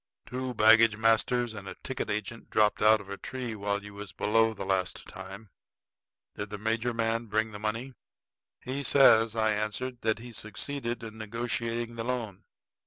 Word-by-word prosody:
"Two 130 0 -4
baggage 110 0 +6
masters 115 +1 +2
and 100 -2 -8
a - - -7
ticket 130 -4 -3
agent 105 +3 -4
dropped 105 -1 +3
out 110 +1 +6
of 100 - -11
a 100 0 -6
tree 125 -3 -5
while 100 -1 -2
you 105 0 -10
was 100 -2 -8
below 110 +4 +2
the 110 - -6
last 95 -2 -1
time. 95 +2 -10 0.8
Did 105 - -5
the 105 - -5
major 115 +3 0
man 115 0 -1
bring 110 +1 0
the 105 - -8
money?" 115 +5 -3 0.7
"He 130 +2 -3
says," 115 -6 +5
I 110 -1 +2
answered, 110 +4 -3
"that 110 -1 +1
he 120 +1 -9
succeeded 115 +3 -4
in 110 -1 -8
negotiating 115 +1 -3
the 115 - -2
loan." 115 -5 -4
110 Hz, 175 wpm, -29 LUFS, 105-120 Hz, 0.8 s, baggage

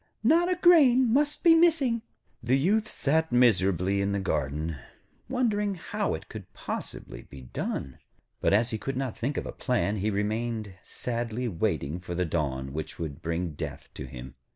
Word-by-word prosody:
'Not 335 +9 +4
a - - +2
grain 270 -9 +6
must 295 +2 +1
be 335 -2 +8
missing.' 310 -9 +3 0.4
The 125 +3 +2
Youth 210 +9 +2
sat 160 -3 0
miserably 100 -5 +3
in 100 0 0
the 100 - 0
garden, 75 -3 -2 0.5
wondering 210 -6 0
how 205 +4 -2
it - - -9
could 105 -5 -10
possibly - - -6
be 70 -2 -12
done. 65 +1 -4 0.4
But - - +2
as 115 +4 +3
he 110 - -2
could 135 +2 -4
not 130 -4 -2
think 140 +5 -2
of - - -2
a - - -5
plan, 105 -5 0
he 105 +2 0
remained 110 0 -2
sadly 120 0 -3
waiting 85 - -1
for 90 -1 -6
the 90 +1 0
dawn 70 -5 -2
which 80 +1 -5
would 80 -5 -5
bring 85 +1 -2
death 75 - -7
to - - -7
him. 60 0 -9
110 Hz, 175 wpm, -28 LUFS, -, 0.5 s, be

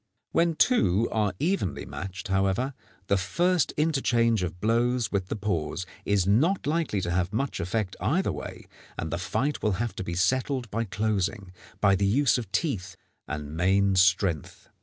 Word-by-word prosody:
When 165 -1 +2
two 115 - +3
are 105 -4 0
evenly 170 - -1
matched, 95 +2 -7
however, 95 +8 +1 0.3
the 100 - +2
first 175 - +1
interchange 120 - +2
of 90 -1 -4
blows 120 +3 +1
with 95 -2 -1
the - - -3
paws 90 -5 -2 0.2
is 100 -3 +2
not 145 - +2
likely 150 - 0
to 85 - -2
have 90 +1 0
much 130 +2 -2
effect 95 +2 -2
either - - +1
way, - - -7 0.3
and 80 - -4
the 85 - -2
fight 135 +10 -1
will 105 - +1
have 115 +5 -2
to - - -3
be 85 -2 -4
settled 125 +5 0
by 115 +2 -1
closing, 100 -1 -1 0.3
by 100 -1 +5
the 100 +1 +1
use 130 +4 +3
of 110 -5 -7
teeth 135 - -2 0.3
and 75 0 -5
main 95 +3 +3
strength. 90 -3 +1
100 Hz, 165 wpm, -27 LUFS, 95-125 Hz, 0.3 s, by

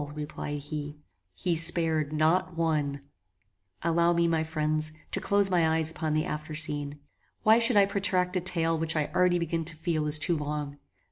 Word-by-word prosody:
replied 150 -1 -5
he: 150 0 -6 0.3
"he 170 - -1
spared 160 -2 +1
NOT 160 +3 +1
ONE!" 150 -4 -1 0.8
Allow 170 +1 +2
me, 170 0 +2
my 165 -1 +1
friends, 155 -1 -2 0.2
to - - -1
close 200 -1 +2
my 165 -3 +3
eyes 160 0 -1
upon 155 -2 -2
the 155 - +1
after 155 0 -5
scene. 145 -2 0 0.5
Why 220 +2 +6
should 230 -1 +5
I 200 - +6
protract 185 -2 0
a 185 - +1
tale 165 -2 0
which 160 0 +1
I 150 -2 -1
already 180 -1 +3
begin 165 -1 -2
to 165 0 -2
feel 160 -1 -2
is 150 +1 +3
too 160 +3 +2
long? 150 -1 -4
160 Hz, 180 wpm, -28 LUFS, 150-175 Hz, 0.8 s, Why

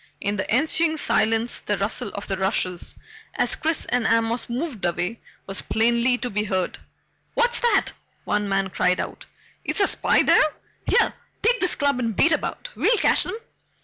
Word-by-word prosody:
In 200 +1 -2
the 190 - -4
ensuing 315 +5 +1
silence 225 -4 +1
the 205 - -2
rustle 200 +1 -1
of 200 - -5
the 195 - -1
rushes 185 -2 -1 0.4
as - - +2
Chris 320 -1 0
and 245 -2 0
Amos 230 +1 +1
moved 245 - -4
away 175 +6 -2 0.3
was 195 0 -2
plainly 235 +2 +2
to 245 - -4
be 210 +1 0
heard. 190 -3 -2 0.6
"What's 480 0 +2
that?" 480 -1 +2 0.3
one 210 -1 -1
man 195 -1 0
cried 180 0 +1
out. - - -6 0.4
"Is - - -1
a 400 - +5
spy - - +3
there? 310 -1 +4 0.3
Here - - +3 0.3
take 480 +3 +3
this 365 - +2
club 280 -3 +1
and 230 -4 -2
beat 325 - +4
about - - -2
we'll 475 - +3
catch - - +3
'em!" - - -4
230 Hz, 175 wpm, -23 LUFS, 200-310 Hz, 0.6 s, a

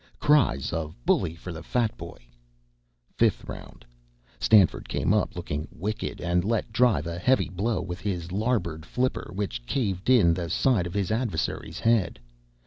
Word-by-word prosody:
(Cries 145 - +2
of 80 -1 -3
"Bully 80 - +2
for 90 +2 -8
the 80 -1 -7
Fat 115 +5 0
Boy!") - - -9 1.0
Fifth - - +3
Round. - - -10 0.5
Stanford 100 -6 +4
came - - +1
up - - 0
looking 75 +2 -4
wicked, 105 +5 -4
and 85 0 +1
let 110 +1 -1
drive 115 - +3
a 85 +1 -4
heavy 130 +9 +2
blow 100 +5 -1
with 90 -1 -6
his 90 -4 -3
larboard 95 -7 -1
flipper 130 +8 -2
which 95 -11 -3
caved 100 -6 -1
in 105 -10 +6
the 85 -1 -3
side 110 -7 +2
of 85 - -8
his 100 -2 0
adversary's 110 -7 -2
head. 115 - +2
95 Hz, 155 wpm, -26 LUFS, 85-115 Hz, 1.0 s, in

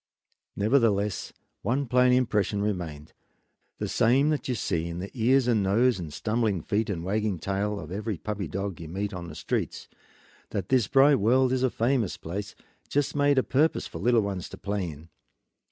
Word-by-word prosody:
Nevertheless 105 -3 +1 0.3
one 130 +7 0
plain 125 +1 +4
impression 105 -5 +1
remained, 85 -8 -4 0.6
the - - -3
same 135 +6 +3
that 150 -5 -1
you 125 - 0
see 85 -6 -1
in 85 0 -5
the 95 +3 -6
ears 125 +2 +3
and 115 -4 +3
nose 110 +4 +2
and 80 -4 -6
stumbling 110 0 -1
feet 110 +2 0
and 85 -5 -3
wagging 105 +1 -1
tail 100 +4 -2
of - - -9
every 105 +1 -3
puppy 105 0 -4
dog 95 +1 -4
you 80 - -7
meet 100 +5 -3
on 85 -2 -6
the 75 - -9
streets, - - -3 0.6
that 95 -3 -4
this 125 -6 +3
bright 135 +1 +5
world 125 +5 +3
is 130 - 0
a 130 - +3
famous 115 -4 0
place, 100 +5 -6 0.3
just 145 0 0
made 145 -1 +3
a 130 - +4
purpose 150 +4 +1
for - - -7
little 120 -1 +3
ones 100 -3 -4
to - - -9
play 100 -3 -2
in. 80 +2 -11
105 Hz, 185 wpm, -27 LUFS, 95-125 Hz, 0.6 s, bright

